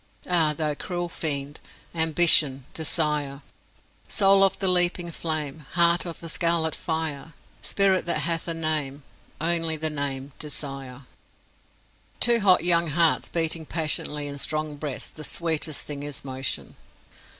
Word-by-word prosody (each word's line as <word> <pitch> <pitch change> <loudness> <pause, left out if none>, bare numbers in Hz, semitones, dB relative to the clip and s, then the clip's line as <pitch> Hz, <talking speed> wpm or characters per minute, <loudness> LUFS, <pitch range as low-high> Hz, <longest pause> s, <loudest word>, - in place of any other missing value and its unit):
Ah, 160 -4 +3
thou 155 -2 0
cruel 175 +3 -4
fiend 145 -3 -3 0.3
Ambition! 160 -5 +4
Desire! 150 -3 -1 0.6
"Soul 195 0 +5
of 195 0 +3
the 195 - 0
leaping 175 -1 +2
flame, 155 -3 -4
Heart 170 0 +3
of 165 - -6
the 165 - -6
scarlet 165 -1 +1
fire, 160 -1 -4 0.3
Spirit 195 -2 +1
that 155 -3 0
hath 165 +2 0
for 165 - -4
name 150 -3 -2 0.4
Only 165 -1 0
the 155 0 -2
name 140 -1 -4
Desire!" 135 -3 -6 1.2
To 235 -1 +5
hot 190 -5 +5
young 170 -1 +3
hearts 160 +1 +2
beating 160 -1 -1
passionately 150 -2 -1
in 140 0 -6
strong 155 +1 -1
breasts, 145 -2 -5
the 155 - -10
sweetest 160 -1 -2
thing 145 -1 -5
is 145 -1 -6
motion. 130 0 -4
160 Hz, 135 wpm, -25 LUFS, 145-170 Hz, 1.2 s, Soul